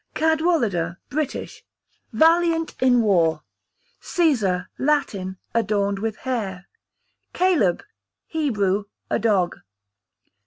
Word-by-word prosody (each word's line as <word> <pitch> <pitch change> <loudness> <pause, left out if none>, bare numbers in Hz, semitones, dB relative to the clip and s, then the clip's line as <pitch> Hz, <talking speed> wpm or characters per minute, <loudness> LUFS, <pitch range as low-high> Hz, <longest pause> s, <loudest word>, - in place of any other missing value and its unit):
Cadwallader, 305 - +1
British, 300 0 -4 0.5
valiant 330 0 +3
in 245 -2 +4
war. 165 -7 +2 0.6
Cæsar, 215 - +1
Latin, 205 -10 0 0.2
adorned 200 -3 0
with 220 +1 -2
hair. 200 -8 -3 0.7
Caleb, 335 - +2 0.4
Hebrew, 210 - 0 0.3
a - - +2
dog. 200 -5 +1
225 Hz, 80 wpm, -23 LUFS, 190-310 Hz, 0.7 s, in